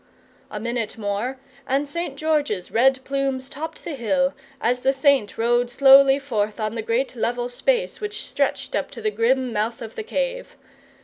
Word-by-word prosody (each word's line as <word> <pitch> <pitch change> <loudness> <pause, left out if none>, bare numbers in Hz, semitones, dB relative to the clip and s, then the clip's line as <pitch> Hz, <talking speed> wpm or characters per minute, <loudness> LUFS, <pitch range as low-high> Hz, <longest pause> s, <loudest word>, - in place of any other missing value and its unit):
A 210 - -5
minute 235 -1 -3
more 220 +5 -3 0.3
and 275 +2 +1
St. 315 -1 -4
George's 290 - 0
red 260 +3 +3
plumes 270 -1 -2
topped 320 +3 -7
the 335 - -5
hill, 270 +2 +1 0.3
as 245 +2 +1
the 265 +2 +2
Saint 270 -5 +2
rode 240 +1 +2
slowly 270 +1 +7
forth 220 -6 -2
on 215 0 -1
the 230 - -3
great 235 +5 -1
level 240 +1 -1
space 485 - -1
which 420 0 -4
stretched - - -1
up - - -1
to - - -9
the 430 - +1
grim 255 - +1
mouth 220 +2 -1
of 225 -2 -8
the - - -5
cave. - - -3
260 Hz, 175 wpm, -23 LUFS, 230-280 Hz, 0.3 s, slowly